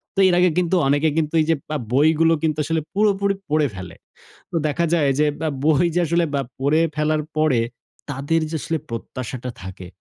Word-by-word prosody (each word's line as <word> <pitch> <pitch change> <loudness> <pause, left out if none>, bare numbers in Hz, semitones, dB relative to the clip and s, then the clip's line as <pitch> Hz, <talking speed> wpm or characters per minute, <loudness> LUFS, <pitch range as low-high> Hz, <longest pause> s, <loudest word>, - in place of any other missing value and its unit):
তো - - -1
এর 175 - +3
আগে 180 0 +5
কিন্তু, 180 0 +2
অনেকে 145 +3 +3
কিন্তু 155 0 0
এই 155 - +1
যে 165 - +4
বা 155 - -1 0.2
বইগুলো 160 +3 +4
কিন্তু 155 -2 +1
আসলে 160 0 0
পুরোপুরি 200 -1 +2
পড়ে 150 -1 +2
ফেলে। 95 -1 -8 0.6
তো - - -3
দেখা 155 +3 0
যায় 145 -5 +2
যে 150 - +4
বা 160 - 0 0.2
বই 155 +1 +4
যে 175 - +2
আসলে 170 +2 +2
বা 140 - +2 0.2
পড়ে 145 +4 +2
ফেলার 150 0 0
পরে, 155 -6 +3 0.5
তাদের 145 +4 0
যে 160 - -2
আসলে 165 -1 -2
প্রত্যাশাটা 125 +2 -5
থাকে, 95 -1 -8
155 Hz, 190 wpm, -21 LUFS, 140-165 Hz, 0.6 s, আগে